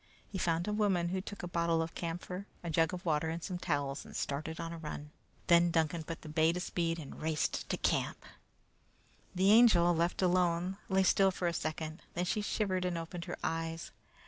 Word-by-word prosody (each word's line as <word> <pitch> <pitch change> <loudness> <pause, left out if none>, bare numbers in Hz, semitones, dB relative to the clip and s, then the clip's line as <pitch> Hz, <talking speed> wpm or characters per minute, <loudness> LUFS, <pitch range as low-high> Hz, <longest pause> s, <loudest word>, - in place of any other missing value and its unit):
He 190 - -3
found 170 +1 +1
a 210 - 0
woman, 195 -5 +2
who 185 +1 -1
took 205 0 -8
a - - -2
bottle 170 -1 +1
of 165 0 -2
camphor, 180 +3 -5 0.2
a 170 - -3
jug 165 0 +3
of 180 -1 -6
water, 160 -1 +1
and 165 +1 -4
some 180 -1 -4
towels, 145 -5 -1
and - - -12
started 155 +3 -3
on 165 0 -4
the 170 - -6
run. 150 -1 -6 0.3
Then 170 0 +6
Duncan 160 0 +1
put 165 +1 -7
the - - -8
bay 155 +1 +3
to 180 - -2
speed 170 -2 -1
and 150 -4 -9
raced 155 -1 -1
to - - 0
camp. - - 0 1.1
The 190 +2 +4
Angel, 210 -7 +7
left 170 +3 +1
alone, 180 0 +2
lay 190 0 +3
still 195 +1 +5
for 185 -1 -2
a 170 - 0
second, 155 0 -3
then 175 - 0
she 210 +4 0
shivered 195 -3 0
and 180 -2 -1
opened 170 +1 -5
her 175 - -5
eyes. 165 0 -2
170 Hz, 205 wpm, -33 LUFS, 165-180 Hz, 1.1 s, Angel